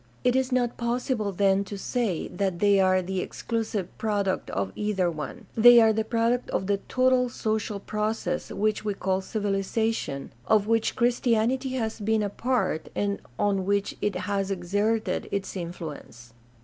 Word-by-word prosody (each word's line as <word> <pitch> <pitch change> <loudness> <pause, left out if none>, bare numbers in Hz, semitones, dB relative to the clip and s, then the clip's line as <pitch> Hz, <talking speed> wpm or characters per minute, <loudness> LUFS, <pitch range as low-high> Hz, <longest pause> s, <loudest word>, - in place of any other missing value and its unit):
It 250 0 +3
is 260 0 +1
not 245 -2 +1
possible 235 -3 -1
then 195 +1 +2
to 200 +1 -6
say 215 -4 -1
that 190 -1 -1
they 200 +1 +4
are 185 -1 +3
the 190 +1 -2
exclusive 220 -2 -3
product 205 -3 -1
of 95 -1 -2
either 195 -4 0
one; 150 -4 -7
they 240 +1 +9
are 220 -1 +5
the 220 +1 0
product 230 +2 0
of 190 - -1
the 200 +1 +1
total 255 -1 +3
social 215 -3 -2
process 215 +2 -2
which 215 0 0
we 205 -2 -1
call 190 0 0
civilization, 200 -6 -2
of 215 -2 +4
which 225 0 +1
Christianity 245 +2 +1
has 225 -4 -2
been 215 +1 +1
a 205 - -1
part, 205 -8 -1
and 200 0 -1 0.2
on 200 -2 +1
which 200 0 0
it 205 - 0
has 200 -1 -1
exerted 205 +4 -1
its 200 0 -3
influence. 155 - -7
210 Hz, 160 wpm, -26 LUFS, 190-230 Hz, 0.2 s, they